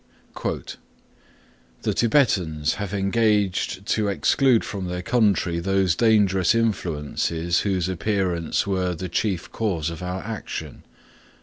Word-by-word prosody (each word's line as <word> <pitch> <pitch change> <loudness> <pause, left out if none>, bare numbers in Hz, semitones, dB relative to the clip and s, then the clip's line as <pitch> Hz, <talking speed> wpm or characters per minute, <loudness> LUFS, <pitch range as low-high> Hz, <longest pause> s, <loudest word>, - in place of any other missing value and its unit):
(3) - - -3 1.2
"The - - 0
Tibetans 90 - +2
have 100 -2 -3
engaged 100 -2 +1
to 110 0 0
exclude 120 +4 +3
from 95 -3 -5
their 90 0 -4
country 100 -6 +2
those 95 0 +2
dangerous 105 -3 +3
influences 85 -5 0
whose 95 -3 0
appearance 90 -2 -1
were 90 -3 -1
the 90 +2 -5
chief 95 -6 -2
cause 85 -8 -1
of 85 - -8
our 90 +1 -4
action." 110 0 -6
95 Hz, 115 wpm, -23 LUFS, 90-105 Hz, 1.2 s, exclude